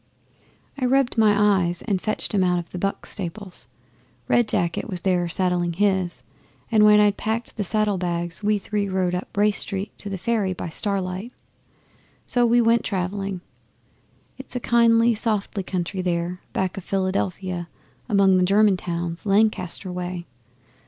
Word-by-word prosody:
'I 255 - 0
rubbed 270 -1 +2
my 210 -3 +4
eyes, 175 0 -2
and 195 -5 -1
fetched 215 - -2
'em 195 -2 +3
out 180 -1 +2
of 170 -1 -4
the 180 - -5
"Buck" 195 +2 -2
stables. 180 - -6 0.6
Red 240 -2 +3
Jacket 170 +3 -1
was 180 -3 -4
there 180 -2 +1
saddling 175 -1 0
his, 185 -7 0 0.5
and 215 -2 +5
when 210 0 +7
I'd 205 -1 +3
packed 225 +2 -3
the 210 - -2
saddle 210 0 +1
bags 175 -1 -1
we 210 0 +2
three 205 0 -2
rode 185 -1 0
up 180 +2 -5
Race 210 0 +3
Street 200 +1 -4
to 205 - -6
the 195 - -3
Ferry 200 -1 0
by 175 - -6
starlight. 190 +4 -1 0.9
So 245 -1 +2
we 240 +1 +4
went 230 0 +3
travelling. 195 -1 -3 1.0
It's 265 - -10
a - - 0
kindly, 235 0 +4
softly 210 -2 -1
country 185 0 -3
there, 175 0 -2
back 190 0 -2
of 195 - -5
Philadelphia 185 -2 -2 0.4
among 195 -3 +4
the 185 - +3
German 200 +1 +4
towns, 170 +1 -4
Lancaster 200 -3 +1
way. 180 -1 -5
195 Hz, 160 wpm, -23 LUFS, 180-210 Hz, 1.0 s, when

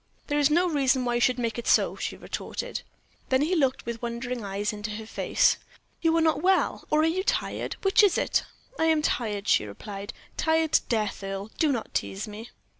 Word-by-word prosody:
"There 290 0 0
is 290 0 +4
no 345 +4 +3
reason 270 -5 +2
why 240 - 0
you 240 - +1
should 250 0 +3
make 235 -1 -2
it 235 - -6
so," - - +4
she - - -4
retorted. - - -5 0.5
Then 260 +2 +3
he 330 +5 0
looked 270 -7 +1
with 235 -1 -5
wondering 240 0 -4
eyes 200 +1 -2
into 210 +1 -5
her 220 0 -7
face. 220 - +2 0.4
"You 330 0 +3
are - - +3
not 320 -1 +2
well, 375 +2 +2
or 305 0 +3
are - - +3
you 350 +4 +1
tired; - - -1
which 390 +3 +5
is 410 -3 +4
it?" - - +1 0.4
"I 320 - +3
am 320 -2 +3
tired," 210 -6 -1
she - - +4
replied; 195 - -7 0.3
"tired 320 -1 +2
to - - +5
death, 215 -3 -1
Earle. 195 +2 -5
Do 310 -3 +3
not 235 -5 -3
tease 195 +3 -2
me." 215 +2 -8
250 Hz, 210 wpm, -27 LUFS, 215-320 Hz, 0.5 s, which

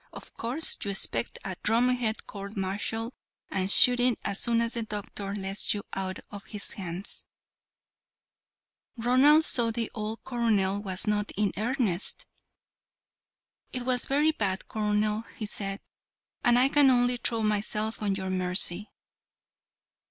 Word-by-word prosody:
Of - - -12
course, 255 +8 -1
you 200 - -3
expect 120 -12 0
a 185 -2 -4
drumhead 235 0 +1
court 200 +1 -8
martial 210 +5 -3 0.4
and 190 0 -1
shooting 245 +3 +6
as 200 - -1
soon 235 -1 +2
as 230 0 -1
the 235 - -3
doctor 205 -2 -5
lets 195 +1 -1
you 205 - -5
out 190 -1 -3
of 200 -1 -9
his 210 -2 -7
hands." 185 0 -5 1.7
Ronald 265 +7 +4
saw 240 - +4
that 225 - -3
the 230 -2 -2
old 215 0 -5
colonel 210 -6 0
was 190 -2 -1
not 210 -1 0
in 205 -1 +1
earnest. 220 -4 0 1.5
"It 250 - -2
was 250 0 +2
very 295 +3 +3
bad, 195 -9 -3
colonel," 210 0 -1
he 215 - -4
said, 195 -1 -5 0.6
"and 240 0 +4
I 255 +2 +5
can 280 0 +5
only 245 -1 +3
throw 230 -1 -1
myself 215 +1 -2
on 200 -2 0
your 190 -1 -4
mercy." 185 +1 +3
215 Hz, 140 wpm, -27 LUFS, 195-240 Hz, 1.7 s, shooting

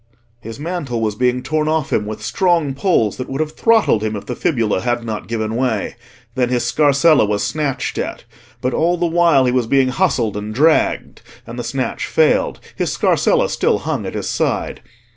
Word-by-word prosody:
His 115 +2 -9
mantle 150 -7 -3
was 110 -2 -1
being 125 +3 0
torn 155 +3 -1
off 155 -2 -1
him 105 - 0
with 110 - -6
strong 170 -7 +1
pulls 130 - +1
that 130 - -6
would 135 +1 -4
have 155 -1 -1
throttled 220 - +2
him 110 0 -2
if 100 - -7
the 125 - -4
fibula 115 - 0
had 120 -1 -1
not 110 -2 -5
given 110 -1 -2
way. 120 -4 -1 0.4
Then 125 0 0
his 125 -1 0
scarsella 150 +1 +4
was 105 -1 0
snatched 145 -4 -2
at; - - -4 0.4
but 130 0 -1
all 175 +2 +1
the 175 - 0
while 165 -5 +3
he 125 - +2
was 125 -2 0
being 135 +1 +3
hustled 120 -3 0
and 105 +1 -5
dragged; 155 +5 +1 0.2
and - - -8
the - - -3
snatch - - -3
failed—his 475 - 0
scarsella - - +2
still - - +1
hung - - -3
at - - -6
his - - -3
side. - - -2
130 Hz, 190 wpm, -18 LUFS, 115-155 Hz, 0.4 s, scarsella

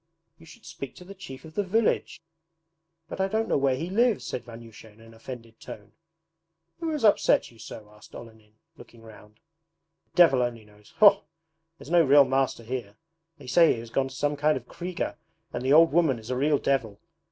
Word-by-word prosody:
'You 165 - -17
should - - -16
speak 160 -5 -9
to 180 - -13
the 195 - -10
Chief 135 -9 -11
of 160 - -13
the 205 - -1
Village!' 200 -4 -1 0.8
'But 190 - -5
I 190 - +1
don't 220 +3 -1
know - - 0
where 135 -1 +1
he 160 +6 -5
lives,' 235 +1 +1
said 125 - -5
Vanyusha 115 -1 -13
in 105 - -23
an 115 0 -16
offended 115 -1 -11
tone. 105 -2 -11 0.9
'Who 330 -1 -3
has 300 -7 -1
upset 205 - +3
you 115 - -21
so?' 110 -1 -10
asked 105 - -17
Olenin, 110 -2 -14 0.2
looking 115 -1 -16
round. 105 -1 -16 0.7
'The - - -44
devil 160 -8 +5
only 120 -3 -3
knows. 105 0 -21
Faugh! 205 -2 +6 0.6
There - - -14
is 150 - -10
no 175 -1 +5
real 140 -1 +6
master 130 -2 -1
here. 115 -4 -6 0.4
They 145 - -14
say 160 +6 +4
he - - -7
has 115 0 -11
gone 135 +1 0
to 135 - -11
some 145 +2 -1
kind 150 +2 +1
of - - -10
KRIGA, 180 0 -5 0.4
and 120 - -4
the 135 +2 +2
old 165 +2 +6
woman 160 -7 +2
is 110 +2 -9
a - - -1
real 145 +3 +2
devil. 115 -8 -2
135 Hz, 210 wpm, -26 LUFS, 115-165 Hz, 0.9 s, Faugh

